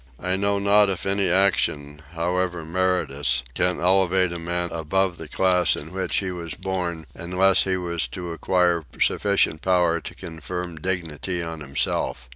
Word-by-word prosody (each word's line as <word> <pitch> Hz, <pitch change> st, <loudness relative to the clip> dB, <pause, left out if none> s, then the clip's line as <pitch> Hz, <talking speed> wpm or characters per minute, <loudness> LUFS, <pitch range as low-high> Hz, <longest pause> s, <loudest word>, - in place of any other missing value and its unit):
I 90 Hz, 0 st, 0 dB
know 100 Hz, +1 st, +1 dB
not 100 Hz, +1 st, +4 dB
if 95 Hz, -2 st, -2 dB
any 100 Hz, 0 st, +2 dB
action, 75 Hz, -6 st, +1 dB
however 90 Hz, 0 st, -1 dB
meritorious, 80 Hz, -8 st, +1 dB
can 90 Hz, +5 st, +1 dB
elevate 95 Hz, 0 st, +3 dB
a 85 Hz, -, -5 dB
man 85 Hz, +1 st, -1 dB
above 85 Hz, +3 st, 0 dB
the 80 Hz, -, -8 dB
class 90 Hz, +1 st, +2 dB
in 80 Hz, +3 st, -8 dB
which 95 Hz, 0 st, -2 dB
he 95 Hz, -2 st, -1 dB
was 85 Hz, -4 st, -6 dB
born 90 Hz, -4 st, -3 dB
unless 90 Hz, +3 st, +2 dB
he 95 Hz, -1 st, 0 dB
were 85 Hz, -2 st, -4 dB
to 85 Hz, +6 st, -3 dB
acquire 85 Hz, 0 st, +1 dB, 0.2 s
sufficient 80 Hz, -, +2 dB
power 90 Hz, -3 st, +2 dB
to -, -, -9 dB
confer 85 Hz, +3 st, -6 dB
dignity 85 Hz, +1 st, -3 dB
on 80 Hz, -1 st, -6 dB
himself. 70 Hz, -2 st, -2 dB
90 Hz, 155 wpm, -23 LUFS, 80-95 Hz, 0.2 s, not